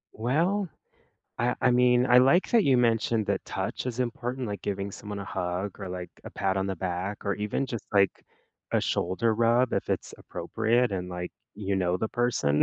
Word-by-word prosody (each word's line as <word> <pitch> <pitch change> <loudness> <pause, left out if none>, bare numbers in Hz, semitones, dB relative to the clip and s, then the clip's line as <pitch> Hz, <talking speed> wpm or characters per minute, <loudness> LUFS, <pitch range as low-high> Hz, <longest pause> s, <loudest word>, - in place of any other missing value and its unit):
Well, 165 - +1 0.7
I 120 +1 +1
I 125 - +4
mean, 125 0 +4
I 125 - +6
like 135 +9 +5
that 230 -4 +5
you 130 -3 +4
mentioned 115 -2 +2
that - - -1
touch - - -3
is 125 0 -3
important, 125 +1 -2
like 100 - -5
giving 100 0 -2
someone 105 0 -7
a 100 - -5
hug 90 +3 -3
or, 95 -2 -5
like, 90 -1 -5
a - - -7
pat 95 -1 -1
on 95 0 0
the 95 -2 -2
back 95 +3 -3
or 100 - +1
even 105 +6 -2
just, 115 -4 -5
like, 100 -2 +2 0.5
a - - +3
shoulder 110 +6 0
rub 120 +2 +3
if - - -2
it's - - -2
appropriate 115 0 0
and, 90 -1 -3
like, 90 0 -4 0.2
you 100 -2 -2
know 90 -1 +1
the 110 - -1
person. 110 -12 +2
110 Hz, 195 wpm, -28 LUFS, 95-125 Hz, 0.7 s, I